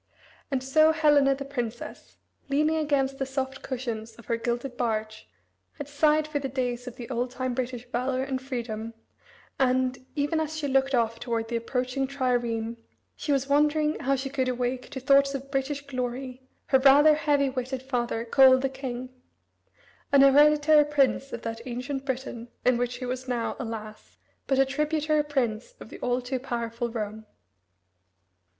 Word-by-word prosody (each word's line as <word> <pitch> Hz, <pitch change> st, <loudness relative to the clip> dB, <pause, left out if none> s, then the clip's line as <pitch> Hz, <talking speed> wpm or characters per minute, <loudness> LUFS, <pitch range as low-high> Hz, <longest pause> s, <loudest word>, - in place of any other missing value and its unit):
And 265 Hz, -2 st, -1 dB
so 310 Hz, +4 st, +5 dB
Helena 295 Hz, -3 st, +4 dB
the 275 Hz, +1 st, -6 dB
princess, 240 Hz, -4 st, -6 dB, 0.3 s
Leaning 305 Hz, +3 st, +2 dB
against 275 Hz, -3 st, 0 dB
the 270 Hz, -, 0 dB
soft 270 Hz, 0 st, -3 dB
cushions 230 Hz, -4 st, -5 dB
of 235 Hz, -, -15 dB
her 230 Hz, -, 0 dB
gilded 240 Hz, +2 st, -3 dB
barge, 220 Hz, -2 st, -3 dB, 0.4 s
had 290 Hz, -3 st, -7 dB
sighed 300 Hz, +1 st, +2 dB
for 300 Hz, -1 st, -2 dB
the 275 Hz, -1 st, -4 dB
days 245 Hz, -1 st, -3 dB
of 245 Hz, -, -7 dB
the 240 Hz, -, -8 dB
old 245 Hz, +1 st, -1 dB
time 255 Hz, 0 st, -3 dB
British 245 Hz, -1 st, -4 dB
valor 255 Hz, +2 st, -1 dB
and 265 Hz, -1 st, -3 dB
freedom, 230 Hz, -4 st, -5 dB, 0.6 s
and, 255 Hz, -1 st, +1 dB
even 295 Hz, +2 st, 0 dB
as 315 Hz, 0 st, -3 dB
she 300 Hz, -2 st, -2 dB
looked 270 Hz, 0 st, +2 dB
off 230 Hz, -1 st, 0 dB
toward 230 Hz, -2 st, -2 dB
the 235 Hz, -, -2 dB
approaching 255 Hz, +3 st, -1 dB
triareme, 240 Hz, -4 st, -1 dB, 0.4 s
she 295 Hz, -, -3 dB
was 275 Hz, -1 st, +1 dB
wondering 300 Hz, +2 st, +2 dB
how 275 Hz, +1 st, +1 dB
she 270 Hz, 0 st, -4 dB
could 260 Hz, -2 st, 0 dB
awake 250 Hz, 0 st, -2 dB
to 265 Hz, -, -6 dB
thoughts 275 Hz, +1 st, +4 dB
of 275 Hz, +1 st, -7 dB
British 280 Hz, +1 st, -2 dB
glory 255 Hz, -1 st, -4 dB, 0.3 s
her 265 Hz, -, +5 dB
rather 285 Hz, +3 st, +7 dB
heavy 290 Hz, -3 st, +1 dB
witted 255 Hz, 0 st, -4 dB
father, 240 Hz, -3 st, -2 dB
Coel 260 Hz, +2 st, +7 dB
the 270 Hz, +1 st, -1 dB
King 255 Hz, -2 st, -6 dB, 1.0 s
an 280 Hz, -, +6 dB
hereditary 295 Hz, +2 st, +6 dB
prince 275 Hz, -2 st, +1 dB
of 235 Hz, -, -6 dB
that 225 Hz, 0 st, -4 dB
ancient 260 Hz, +3 st, -4 dB
Britain 255 Hz, -3 st, -4 dB, 0.2 s
in 250 Hz, -1 st, +4 dB
which 245 Hz, 0 st, -1 dB
he 250 Hz, +1 st, -6 dB
was 255 Hz, +1 st, -4 dB
now, 240 Hz, -2 st, -1 dB
alas, 220 Hz, -3 st, -7 dB, 0.3 s
but 270 Hz, -, +2 dB
a 270 Hz, -, +5 dB
tributary 300 Hz, +2 st, 0 dB
prince 265 Hz, -, -2 dB
of -, -, -11 dB
the -, -, -10 dB
all 245 Hz, 0 st, 0 dB
too 255 Hz, +1 st, -3 dB
powerful 235 Hz, -2 st, -3 dB
Rome. 220 Hz, -1 st, -5 dB
260 Hz, 170 wpm, -27 LUFS, 240-280 Hz, 1.0 s, rather